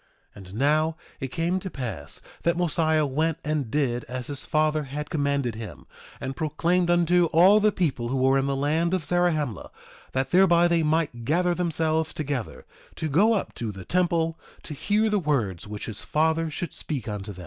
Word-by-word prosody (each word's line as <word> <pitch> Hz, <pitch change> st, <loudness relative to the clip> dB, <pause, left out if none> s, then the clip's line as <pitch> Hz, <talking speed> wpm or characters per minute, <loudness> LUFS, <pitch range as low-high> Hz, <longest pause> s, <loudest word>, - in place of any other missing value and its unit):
1:18 -, -, -14 dB
And 95 Hz, 0 st, -11 dB
now, 155 Hz, +5 st, +2 dB, 0.2 s
it 135 Hz, -, -3 dB
came 170 Hz, +6 st, -1 dB
to 190 Hz, -, -6 dB
pass 110 Hz, -, -5 dB, 0.2 s
that 170 Hz, +1 st, +1 dB
Mosiah 160 Hz, -3 st, +2 dB
went 155 Hz, +3 st, 0 dB
and 150 Hz, -5 st, -1 dB
did 125 Hz, -3 st, 0 dB
as 125 Hz, 0 st, -5 dB
his 145 Hz, -1 st, -6 dB
father 155 Hz, -1 st, +1 dB
had 145 Hz, +2 st, -6 dB
commanded 140 Hz, -5 st, 0 dB
him, 105 Hz, -12 st, -9 dB, 0.3 s
and 135 Hz, -, -5 dB
proclaimed 170 Hz, +4 st, 0 dB
unto 175 Hz, 0 st, +4 dB
all 180 Hz, +6 st, +6 dB
the 215 Hz, 0 st, +3 dB
people 140 Hz, -11 st, -1 dB
who 130 Hz, +3 st, -1 dB
were 135 Hz, +1 st, +3 dB
in 135 Hz, -, -1 dB
the 140 Hz, -, 0 dB
land 160 Hz, +6 st, +1 dB
of 175 Hz, -5 st, -3 dB
Zarahemla 155 Hz, -, 0 dB, 0.4 s
that 130 Hz, 0 st, -1 dB
thereby 175 Hz, -2 st, +5 dB
they 170 Hz, -1 st, +2 dB
might 150 Hz, -6 st, 0 dB
gather 175 Hz, +7 st, +2 dB
themselves 160 Hz, -2 st, 0 dB
together, 140 Hz, -6 st, -4 dB, 0.3 s
to 155 Hz, -, -3 dB
go 200 Hz, +11 st, +4 dB
up 205 Hz, -, -2 dB
to 115 Hz, -3 st, -4 dB
the 95 Hz, -2 st, -10 dB
temple 170 Hz, -2 st, +1 dB, 0.2 s
to 155 Hz, -, -6 dB
hear 210 Hz, +9 st, +1 dB
the 210 Hz, -1 st, +2 dB
words 115 Hz, -, -1 dB
which 105 Hz, 0 st, -6 dB
his 105 Hz, -3 st, -6 dB
father 160 Hz, +1 st, +1 dB
should 170 Hz, +3 st, -5 dB
speak 140 Hz, -7 st, -5 dB
unto 105 Hz, -1 st, -5 dB
them. 95 Hz, -, -11 dB
155 Hz, 190 wpm, -25 LUFS, 130-170 Hz, 0.4 s, all